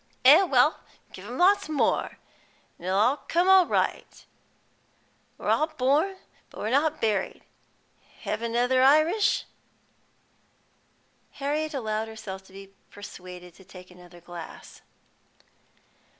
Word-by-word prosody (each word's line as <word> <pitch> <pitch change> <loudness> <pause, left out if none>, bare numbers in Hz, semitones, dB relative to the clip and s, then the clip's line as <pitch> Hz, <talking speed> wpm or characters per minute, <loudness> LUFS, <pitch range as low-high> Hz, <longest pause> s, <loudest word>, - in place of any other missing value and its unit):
"Eh 295 +7 +9
well, 295 -5 +3 0.3
give - - -11
him - - -7
lots 390 0 +3
more, 305 -3 0 0.6
an' 175 - -11
it'll 190 +1 +1
all 245 +8 +3
come 370 +1 +4
right. - - -2 1.1
We're - - -4
all 310 - +2
born, 310 +6 0 0.3
but - - -13
we're 215 - -3
not 310 +3 +1
buried. 210 -4 -2 0.8
Hev' 215 - -3
another 245 +2 +1
Irish?" 310 +10 +3 1.9
Harriet 300 +2 -3
allowed 220 -3 -2
herself 205 -4 -8
to 190 - -19
be 195 0 -13 0.2
persuaded 180 -3 -11
to 190 - -18
take 180 0 -14
another 175 -1 -16
glass. 170 -1 -11
250 Hz, 115 wpm, -26 LUFS, 195-310 Hz, 1.9 s, Eh